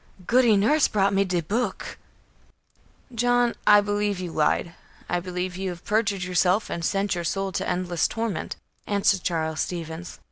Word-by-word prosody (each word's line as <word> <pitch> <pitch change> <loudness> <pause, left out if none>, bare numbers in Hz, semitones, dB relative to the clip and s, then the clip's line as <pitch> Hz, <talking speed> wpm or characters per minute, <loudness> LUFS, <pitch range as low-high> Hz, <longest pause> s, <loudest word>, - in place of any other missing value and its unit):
"Goody 235 -2 +4
Nurse 285 +9 +3
brought 200 -1 +1
me 195 0 +3
de 180 -2 0
book." 210 +5 -3 1.1
"John, 245 0 +2
I 205 0 +8
believe 205 -1 -1
you 180 -2 -5
lied. 160 +2 +1 0.3
I 175 - 0
believe 180 0 -4
you 190 0 -3
have 175 -1 -8
perjured 210 -3 0
yourself 180 +3 +1
and 170 - -4
sent 195 +3 0
your 175 -1 -3
soul 195 +3 -2
to - - -2
endless 180 -1 0
torment," 225 -5 -3 0.3
answered 200 -2 +2
Charles 160 -3 -2
Stevens. 170 0 -5
195 Hz, 155 wpm, -25 LUFS, 175-210 Hz, 1.1 s, I